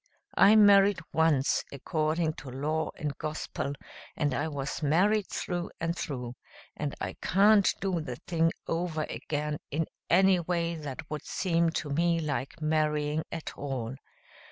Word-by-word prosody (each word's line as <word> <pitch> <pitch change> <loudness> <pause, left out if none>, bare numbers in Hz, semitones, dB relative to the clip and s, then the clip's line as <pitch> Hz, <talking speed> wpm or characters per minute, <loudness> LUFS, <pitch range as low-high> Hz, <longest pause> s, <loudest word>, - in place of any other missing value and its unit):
I 205 +2 +6
married 200 -1 +7 0.2
once 160 -4 +3
according 155 +3 -1
to 135 -1 -8
law 150 +5 -1
and 150 -2 -3
gospel 150 -2 -3 0.4
and 145 -2 +1
I 145 +4 -1
was 145 -1 -4
married 190 +8 +3
through 175 -1 -3
and 165 +1 -1
through, 125 -8 -4 0.4
and 145 -2 -3
I - - -4
can't 200 +1 +5
do 185 -4 -1
the 125 -5 -5
thing 165 -1 +2
over 165 -2 -1
again 150 0 -3
in 160 +3 0 0.2
any 190 +1 +5
way 170 0 -1
that 150 -2 -6
would 150 - -4
seem 170 -3 +1
to 150 -3 -3
me 170 +3 +2
like 140 -1 -3
marrying 155 0 +1
at 165 -1 -5
all. 130 -4 -4
155 Hz, 145 wpm, -29 LUFS, 145-170 Hz, 0.4 s, married